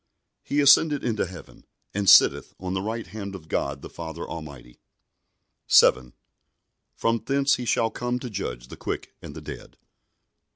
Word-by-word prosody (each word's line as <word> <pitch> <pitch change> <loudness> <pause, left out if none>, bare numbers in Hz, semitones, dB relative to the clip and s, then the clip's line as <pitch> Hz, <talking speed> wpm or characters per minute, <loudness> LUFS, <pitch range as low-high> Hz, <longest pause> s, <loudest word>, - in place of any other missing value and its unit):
He 145 +1 0
ascended 145 +1 +5
into 110 -5 -1
heaven, 90 -2 -13 0.3
and 100 -1 +1
sitteth - - +6
on 90 0 -4
the 95 - -1
right 110 +2 -4
hand 100 +2 -7
of 80 -4 -11
God 70 -3 -3
the - - -6
Father 80 -2 -7
Almighty; 70 -7 -10 0.9
7. 65 -1 +5 0.8
From 115 -1 0
thence 140 +3 +2
He 125 - -5
shall 115 0 +1
come 120 0 -2
to 125 0 -6
judge 60 - -5
the - - -10
quick - - -5
and - - -10
the - - -8
dead. - - -10
100 Hz, 160 wpm, -25 LUFS, 80-120 Hz, 0.9 s, sitteth